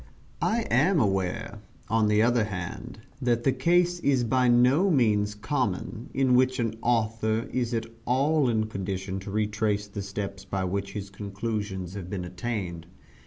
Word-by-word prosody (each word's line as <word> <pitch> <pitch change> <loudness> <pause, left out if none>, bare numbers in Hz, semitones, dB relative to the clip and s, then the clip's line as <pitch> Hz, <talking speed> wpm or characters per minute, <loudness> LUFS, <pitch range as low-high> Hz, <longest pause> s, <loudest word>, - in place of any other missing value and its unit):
I 230 +2 +2
am 185 -3 +4
aware, 100 +1 -1 0.3
on 110 -1 +2
the 105 +1 +4
other 120 -2 +3
hand, 100 +4 -6 0.2
that 120 -2 +1
the 135 - +4
case 175 +6 +2
is 135 -6 +2
by 125 +2 +2
no 125 +10 +5
means 105 - +2
common, 110 +2 -2
in 130 -1 +2
which 130 +1 +4
an 115 -3 -1
author 110 -1 +1
is 125 -1 0
at 115 - -1 0.2
all 140 +2 +3
in 110 -2 +1
condition 95 -2 -4
to 95 - -8
retrace 105 0 0
the 100 0 -6
steps 100 0 -5
by 95 -1 -2
which 100 +2 -2
his 100 -1 -6
conclusions 100 -2 -4
have 95 -3 -6
been 95 -2 -4
attained. 90 -3 -4
110 Hz, 160 wpm, -27 LUFS, 100-125 Hz, 0.3 s, no